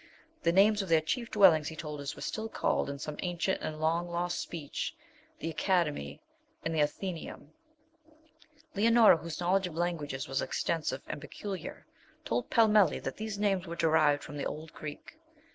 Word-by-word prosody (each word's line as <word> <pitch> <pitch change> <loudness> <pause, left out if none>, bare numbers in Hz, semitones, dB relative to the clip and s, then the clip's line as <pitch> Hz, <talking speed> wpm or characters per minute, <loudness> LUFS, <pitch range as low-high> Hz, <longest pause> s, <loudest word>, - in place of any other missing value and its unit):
The 170 - +3
names 205 +3 +5
of 195 - -6
their 165 -1 +6
chief 235 +9 -2
dwellings, 175 -8 +5
he 160 - -5
told 150 -2 -6
us, 140 - -5
were - - -8
still 220 +1 -3
called, - - 0
in 140 - -4
some 150 +1 -6
ancient 175 +1 -1
and 155 0 -4
long 165 +2 0
lost 175 +1 -1
speech, 155 -5 -4 0.4
'The 165 - -4
Academy,' 170 -3 0 0.5
and 165 - -1
'The 160 - 0
Athenæum.' 155 0 -3 1.2
Leonora, 225 -2 +6
whose 165 0 -6
knowledge 185 +2 +2
of 165 - -9
languages 160 -6 -2
was 135 +1 -1
extensive 145 -5 -2
and 150 - -6
peculiar, 185 +4 -7 0.4
told 120 +1 -1
Pellmelli 215 -3 +5
that - - -5
these 215 -1 -4
names 195 -3 +1
were 170 - -5
derived 155 -3 +3
from 145 - -8
the 140 - -3
old 155 +1 -7
Greek. 155 - -9
170 Hz, 170 wpm, -31 LUFS, 150-195 Hz, 1.2 s, their